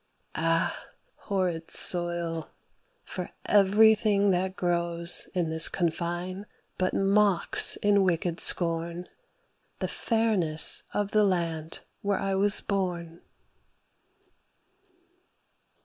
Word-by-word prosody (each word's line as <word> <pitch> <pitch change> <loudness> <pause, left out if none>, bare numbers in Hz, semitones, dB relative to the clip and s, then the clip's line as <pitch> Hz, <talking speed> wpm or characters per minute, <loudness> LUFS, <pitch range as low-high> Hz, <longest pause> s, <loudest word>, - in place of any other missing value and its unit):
Ah 165 +2 -2 0.3
horrid 180 -5 -4
soil! 170 -2 +1 0.5
for - - -7 0.2
everything 205 0 +3
that 185 +1 -2
grows 170 -1 +1
In 170 -3 -2
this 160 0 +4
confine 175 +3 -4 0.3
but 185 0 -1
mocks 200 -1 +2
in 205 -1 +3
wicked 175 -2 -2
scorn 170 0 +2 0.7
The - - -4
fairness 210 -9 0
of 205 0 -3
the 215 -1 +2
land 165 -4 -3 0.2
where 200 -1 -1
I 195 0 -3
was 200 +1 +4
born. 175 -4 -5
180 Hz, 90 wpm, -26 LUFS, 170-200 Hz, 0.7 s, this